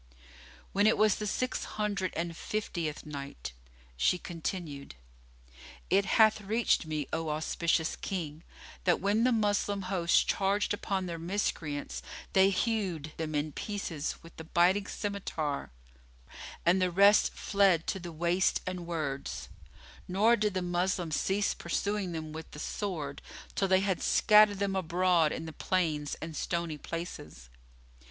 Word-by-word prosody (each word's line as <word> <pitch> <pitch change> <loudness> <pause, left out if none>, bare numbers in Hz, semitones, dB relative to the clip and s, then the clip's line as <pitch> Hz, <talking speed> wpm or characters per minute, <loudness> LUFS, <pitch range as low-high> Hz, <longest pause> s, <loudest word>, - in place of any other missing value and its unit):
When 205 +2 +3
it 220 - +4
was 215 -2 +4
the 210 - -3
Six 255 +5 -1
Hundred 200 -3 -2
and 170 0 -2
Fiftieth 170 -6 -3
Night, 140 - -7 0.4
She - - +2
continued, 165 - -5 1.0
It 195 +1 +4
hath 220 -1 +6
reached 215 -4 +1
me, 155 -3 -2
O 160 0 -1
auspicious 160 +2 0
King, 160 -5 -4 0.4
that 175 - +4
when 205 +4 +2
the 255 - +4
Moslem 205 -3 +1
host 185 -2 +2
charged 200 +1 +1
upon 195 -2 -2
the 170 -2 -5
Miscreants 155 - -2 0.3
they 190 0 +6
hewed 190 -7 -1
them 155 -1 -3
in 150 +1 0
pieces 170 -6 -3
with 165 - -14
the 160 - -7
biting 180 +5 +3
scymitar 165 -8 -3 1.0
and 180 +2 +4
the 185 - +3
rest 200 +4 +5
fled 195 -5 +3
to 195 - -2
the 175 -1 -7
wastes 175 +3 +1
and 180 -2 -4
words; 135 - -3 0.6
nor 210 +6 +4
did 210 -3 0
the 185 - 0
Moslems 175 -2 0
cease 200 +5 +1
pursuing 200 +2 -2
them 155 -2 -5
with 160 0 -7
the - - -8
sword, 155 -6 -4 0.3
till 195 - +1
they 190 0 +4
had 195 -2 0
scattered 210 -1 +5
them 195 -1 -1
abroad 175 -2 +2
in 165 - -4
the 160 - -7
plains 155 -7 0
and 160 -1 -6
stony 170 -3 -2
places. 140 - -7
180 Hz, 145 wpm, -30 LUFS, 160-200 Hz, 1.0 s, hath